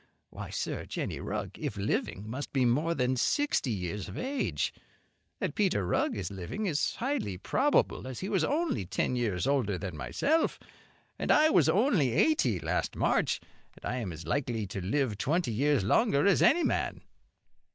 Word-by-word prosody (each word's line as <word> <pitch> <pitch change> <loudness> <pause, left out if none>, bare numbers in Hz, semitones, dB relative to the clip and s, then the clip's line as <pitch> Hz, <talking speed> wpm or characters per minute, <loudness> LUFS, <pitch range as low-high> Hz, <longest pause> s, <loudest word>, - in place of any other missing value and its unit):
Why, - - -7
sir, - - -3
Jenny - - -3
Rugg - - -4
if 105 - -4
living 100 0 -2
must 130 +6 -5
be 130 -2 +3
more 150 +8 +2
than 125 -1 +1
sixty 285 - +1
years 95 -2 -3
of - - -8
age. 270 +2 -1 0.7
That - - -2
Peter 185 - +1
Rugg 90 - 0
is 95 -3 -4
living 100 - -4
is 155 -5 0
highly 240 - -2
probable, 265 - +1
as 130 -2 -6
he 190 - -3
was - - +1
only 305 - 0
ten 125 - 0
years 105 -7 0
older 125 -9 +1
than 90 -2 -5
myself; 310 - 0 0.6
and - - -3
I 310 +1 +6
was 165 -5 +4
only 185 - +3
eighty 125 - +3
last - - -1
March, - - +1 0.3
and - - -12
I 125 - -2
am 110 -8 -3
as 80 0 -8
likely 115 - -1
to 95 0 -5
live 110 +2 0
twenty 160 -3 0
years 140 +1 +2
longer 145 - +3
as 200 - +4
any 345 +1 +5
man." - - -1
130 Hz, 170 wpm, -30 LUFS, -, 0.7 s, I